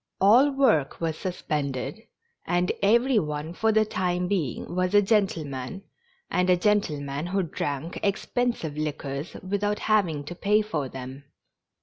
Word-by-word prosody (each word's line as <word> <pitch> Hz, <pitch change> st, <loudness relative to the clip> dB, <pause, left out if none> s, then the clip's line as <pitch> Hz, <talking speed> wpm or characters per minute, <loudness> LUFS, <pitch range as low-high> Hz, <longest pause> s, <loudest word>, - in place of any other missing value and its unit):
All 235 Hz, +9 st, +6 dB
work 260 Hz, -, +2 dB
was 165 Hz, -2 st, -1 dB
sus 180 Hz, +2 st, -5 dB
pended, 145 Hz, +6 st, -2 dB, 0.5 s
and 175 Hz, 0 st, +1 dB
every 235 Hz, +4 st, +4 dB
one 150 Hz, 0 st, -4 dB
for 220 Hz, +4 st, +1 dB
the 220 Hz, 0 st, +3 dB
time 180 Hz, -3 st, -1 dB
being 175 Hz, -, -2 dB
was 185 Hz, +2 st, 0 dB
a 205 Hz, -, +8 dB
gentle 195 Hz, -6 st, +1 dB
man, 135 Hz, +7 st, -6 dB, 0.5 s
and 180 Hz, 0 st, +1 dB
a 180 Hz, -, +5 dB
gentleman 155 Hz, -7 st, 0 dB
who 195 Hz, +1 st, 0 dB
drank 150 Hz, 0 st, -4 dB
expensive 205 Hz, -5 st, -1 dB
liquors 150 Hz, 0 st, -4 dB
without 205 Hz, +1 st, 0 dB
having 180 Hz, -9 st, +1 dB
to 150 Hz, -, -7 dB
pay 210 Hz, +4 st, +2 dB
for 150 Hz, -10 st, -3 dB
them. 130 Hz, +2 st, -8 dB
180 Hz, 145 wpm, -26 LUFS, 150-205 Hz, 0.5 s, a